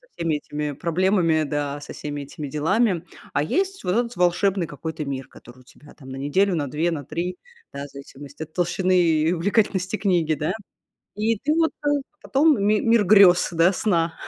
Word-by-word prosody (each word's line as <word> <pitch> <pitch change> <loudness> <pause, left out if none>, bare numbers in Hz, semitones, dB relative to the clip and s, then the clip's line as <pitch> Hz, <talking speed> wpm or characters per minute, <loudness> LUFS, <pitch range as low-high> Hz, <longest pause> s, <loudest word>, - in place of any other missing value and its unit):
всеми 165 -2 -1
этими 150 0 -4
проблемами, 170 0 +1
да, 145 -1 -3
со - - -9
всеми 145 -1 -5
этими 145 +1 -7
делами, 180 - +1 0.3
а 145 - +1
есть 385 - -1
вот 180 - -1
этот 240 0 -1
волшебный 180 0 +1
какой-то 155 +2 -6
мир, 135 -1 -5
который 120 +1 -16
у - - -18
тебя 145 +3 -18
там 135 -3 -14
на 130 - -6
неделю, 175 +8 +1
на 145 -4 -2
2, 165 +5 0
на 145 -3 -4
3, 170 +6 -4 0.4
да, 140 0 -5
в - - -12
зависимости 140 +2 -10
от 155 - -14
толщины 180 +1 +1
и 160 0 +2
увлекательности 190 +1 0
книги, 175 -5 +1
да, 155 +5 -2 0.6
и 220 +1 0
ты 300 +7 0
вот, 325 -1 +2
э, - - +2 0.3
потом 285 -4 +3
ми 210 0 +3
мир 230 -2 +3
грёз, 190 -3 +6
да, 170 +2 +4
сна. 170 -5 0
170 Hz, 185 wpm, -23 LUFS, 150-195 Hz, 0.6 s, грёз